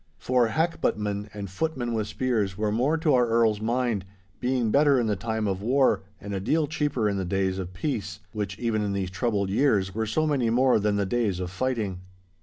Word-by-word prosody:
For 125 Hz, -2 st, +2 dB
hackbuttmen, 105 Hz, -8 st, -1 dB
and 100 Hz, -1 st, -6 dB
footmen 120 Hz, -, -2 dB
with 110 Hz, -2 st, -1 dB
spears, 105 Hz, -4 st, -1 dB
were 105 Hz, -1 st, 0 dB
more 130 Hz, +9 st, +1 dB
to 155 Hz, -2 st, +2 dB
our 125 Hz, -2 st, +4 dB
Earl's 115 Hz, -2 st, +2 dB
mind, 120 Hz, -3 st, 0 dB, 0.4 s
being 125 Hz, -3 st, 0 dB
better 140 Hz, 0 st, +4 dB
in 120 Hz, -, +1 dB
the 105 Hz, -2 st, +1 dB
time 110 Hz, +2 st, -2 dB
of 95 Hz, -1 st, -2 dB
war, 130 Hz, +3 st, +3 dB, 0.2 s
and 100 Hz, 0 st, -6 dB
a 95 Hz, -, -1 dB
deal 150 Hz, +11 st, +1 dB
cheaper 145 Hz, -6 st, -1 dB
in 100 Hz, -1 st, 0 dB
the 95 Hz, -, -1 dB
days 95 Hz, +1 st, -1 dB
of 90 Hz, -1 st, -5 dB
peace—which 95 Hz, -, -4 dB
even 115 Hz, -3 st, 0 dB
in 100 Hz, -1 st, -1 dB
these 95 Hz, -2 st, -2 dB
troubled 100 Hz, -1 st, -1 dB
years 100 Hz, -5 st, +2 dB
were 110 Hz, 0 st, -2 dB
so 155 Hz, +9 st, +1 dB
many 135 Hz, -6 st, +1 dB
more 125 Hz, +1 st, +4 dB
than 105 Hz, 0 st, +1 dB
the 100 Hz, -1 st, +1 dB
days 105 Hz, -3 st, 0 dB
of 90 Hz, -1 st, -4 dB
fighting. 105 Hz, -3 st, -2 dB
110 Hz, 205 wpm, -26 LUFS, 100-125 Hz, 0.4 s, our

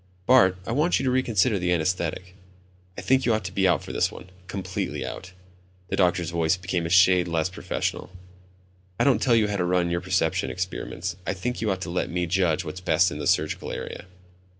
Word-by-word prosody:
"Bart, 105 Hz, -8 st, +5 dB
I -, -, -4 dB
want 150 Hz, +8 st, +2 dB
you -, -, -2 dB
to 130 Hz, -, +2 dB
reconsider 115 Hz, -4 st, +2 dB
the 90 Hz, 0 st, 0 dB
anesthetic. 90 Hz, +1 st, -1 dB, 0.6 s
I -, -, -4 dB
think 130 Hz, +7 st, +2 dB
you 115 Hz, -, +2 dB
ought 110 Hz, -, -3 dB
to 90 Hz, -, -5 dB
be 95 Hz, 0 st, +2 dB
out 85 Hz, -5 st, +2 dB
for -, -, -7 dB
this -, -, +1 dB
one, 90 Hz, -, -12 dB, 0.2 s
completely 95 Hz, -1 st, -4 dB
out." 90 Hz, -, -7 dB, 0.6 s
The -, -, -1 dB
doctor's 90 Hz, -2 st, +1 dB
voice 85 Hz, +1 st, +1 dB
became 90 Hz, -2 st, -2 dB
a -, -, -5 dB
shade 90 Hz, 0 st, +5 dB
less 85 Hz, 0 st, 0 dB
professional. 90 Hz, -, -3 dB, 0.9 s
"I -, -, +4 dB
don't 130 Hz, -6 st, +3 dB
tell 120 Hz, -3 st, +3 dB
you 110 Hz, -2 st, +3 dB
how 105 Hz, -1 st, -2 dB
to 90 Hz, -, 0 dB
run 90 Hz, -1 st, +1 dB
your 85 Hz, 0 st, -1 dB
perception 90 Hz, -3 st, 0 dB
experiments, 90 Hz, -1 st, -4 dB
I 95 Hz, -, -1 dB
think 125 Hz, +7 st, -3 dB
you 110 Hz, -, 0 dB
ought 95 Hz, -2 st, -1 dB
to 90 Hz, -, -4 dB
let 90 Hz, -, -1 dB
me 90 Hz, 0 st, -1 dB
judge 85 Hz, -2 st, +1 dB
what's 90 Hz, +4 st, -6 dB
best 90 Hz, 0 st, +3 dB
in 75 Hz, -, -6 dB
the -, -, -3 dB
surgical -, -, 0 dB
area." -, -, -6 dB
90 Hz, 215 wpm, -25 LUFS, 85-100 Hz, 0.9 s, Bart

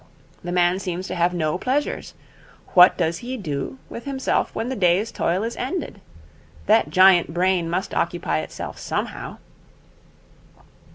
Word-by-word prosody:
The 175 Hz, -, -4 dB
man 175 Hz, +1 st, +2 dB
seems 185 Hz, -1 st, -4 dB
to -, -, -3 dB
have 175 Hz, 0 st, +2 dB
no 170 Hz, -1 st, -1 dB
pleasures. 275 Hz, +6 st, -2 dB, 0.6 s
What 180 Hz, +1 st, +7 dB
does 170 Hz, -1 st, 0 dB
he 255 Hz, +2 st, -5 dB
do 150 Hz, -, -4 dB
with 235 Hz, -, -9 dB
himself 270 Hz, -1 st, -1 dB
when 225 Hz, -, -2 dB
the 260 Hz, -, -3 dB
day's 185 Hz, +2 st, +2 dB
toil 180 Hz, +4 st, 0 dB
is 230 Hz, +1 st, -3 dB
ended? 260 Hz, -, -4 dB, 0.6 s
That 145 Hz, -, +4 dB
giant 180 Hz, -1 st, +5 dB
brain 180 Hz, -1 st, +1 dB
must 185 Hz, +3 st, -2 dB
occupy 165 Hz, -, -1 dB
itself 80 Hz, -, -7 dB
somehow.' -, -, -4 dB
180 Hz, 145 wpm, -23 LUFS, 170-225 Hz, 0.6 s, What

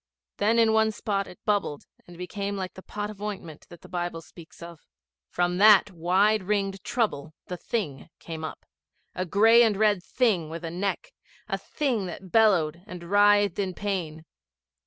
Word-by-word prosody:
Then 220 Hz, +3 st, +2 dB
in 225 Hz, -1 st, +4 dB
one 220 Hz, 0 st, +3 dB
spot 200 Hz, -2 st, -2 dB
it 180 Hz, -, -12 dB
bubbled 200 Hz, -9 st, -1 dB, 0.2 s
and 175 Hz, -1 st, -13 dB
became 200 Hz, +3 st, -4 dB
like 185 Hz, -1 st, -5 dB
the 190 Hz, -, -11 dB
pot 210 Hz, +2 st, -5 dB
of 205 Hz, -1 st, -13 dB
ointment 190 Hz, -7 st, -7 dB
that 175 Hz, -, -13 dB
the -, -, -13 dB
Bible 175 Hz, -2 st, -4 dB
speaks 170 Hz, 0 st, -14 dB
of. 170 Hz, -2 st, -10 dB, 0.5 s
From 175 Hz, +1 st, -1 dB
that 210 Hz, -1 st, +7 dB
wide 190 Hz, +5 st, +2 dB
ringed 195 Hz, 0 st, -2 dB
trouble 160 Hz, -, -2 dB
the 180 Hz, -, -6 dB
Thing 170 Hz, -, -4 dB
came 160 Hz, -1 st, -8 dB
up 155 Hz, -, -7 dB, 0.5 s
a 185 Hz, 0 st, -3 dB
gray 225 Hz, +6 st, +6 dB
and 220 Hz, -4 st, +3 dB
red 210 Hz, -3 st, +3 dB
Thing 190 Hz, -6 st, 0 dB
with 165 Hz, +1 st, -6 dB
a 165 Hz, -, -4 dB
neck 200 Hz, -, -3 dB, 0.4 s
a -, -, -2 dB
Thing 245 Hz, -10 st, -2 dB
that 180 Hz, +1 st, -9 dB
bellowed 175 Hz, -8 st, +3 dB
and 180 Hz, -3 st, -9 dB
writhed 205 Hz, -1 st, +4 dB
in 190 Hz, -3 st, -2 dB
pain. 170 Hz, -6 st, -4 dB
195 Hz, 175 wpm, -26 LUFS, 175-210 Hz, 0.5 s, that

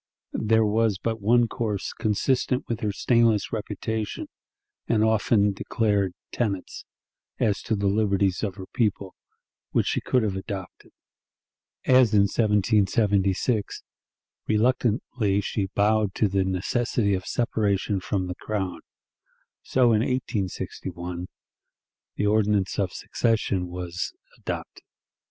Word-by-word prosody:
There 110 Hz, 0 st, +3 dB
was 110 Hz, -1 st, +2 dB
but 115 Hz, +1 st, -3 dB
one 120 Hz, +3 st, +4 dB
course 110 Hz, -4 st, -3 dB
consistent 125 Hz, +4 st, 0 dB
with 115 Hz, -1 st, -2 dB
her 105 Hz, -4 st, -1 dB
stainless 115 Hz, 0 st, +2 dB
reputation 110 Hz, 0 st, -3 dB, 0.6 s
and 110 Hz, -2 st, +2 dB
often 110 Hz, -2 st, +3 dB
declared 100 Hz, -2 st, 0 dB, 0.2 s
tenets, 100 Hz, -6 st, -3 dB, 0.5 s
as 105 Hz, -2 st, +1 dB
to 110 Hz, -, -1 dB
the 100 Hz, 0 st, -2 dB
liberties 100 Hz, -2 st, +2 dB
of 100 Hz, -4 st, -2 dB
her 95 Hz, -2 st, -8 dB
people, 100 Hz, -4 st, -1 dB, 0.6 s
which -, -, +2 dB
she -, -, 0 dB
could 125 Hz, -2 st, +1 dB
have 100 Hz, -3 st, -1 dB
adopted. 95 Hz, -1 st, -7 dB, 0.9 s
As 125 Hz, -4 st, +5 dB
in 100 Hz, -, +6 dB
1776, 105 Hz, 0 st, +1 dB, 0.6 s
reluctantly 110 Hz, -2 st, +1 dB
she 100 Hz, -1 st, -2 dB
bowed 105 Hz, -1 st, +2 dB
to 105 Hz, -, +2 dB
the 95 Hz, -1 st, +1 dB
necessity 100 Hz, +3 st, 0 dB
of 95 Hz, -1 st, -2 dB
separation 105 Hz, -4 st, 0 dB
from 95 Hz, +1 st, -2 dB
the 90 Hz, -, -4 dB
Crown, 95 Hz, -1 st, -3 dB, 0.8 s
so 130 Hz, -, +1 dB
in 110 Hz, -, +4 dB
1861 90 Hz, -7 st, -3 dB, 0.9 s
the 105 Hz, -, -1 dB
ordinance 105 Hz, -2 st, +2 dB
of 95 Hz, -3 st, 0 dB
secession 105 Hz, -6 st, 0 dB
was 90 Hz, 0 st, -4 dB, 0.3 s
adopted. -, -, -6 dB
105 Hz, 115 wpm, -25 LUFS, 95-110 Hz, 0.9 s, in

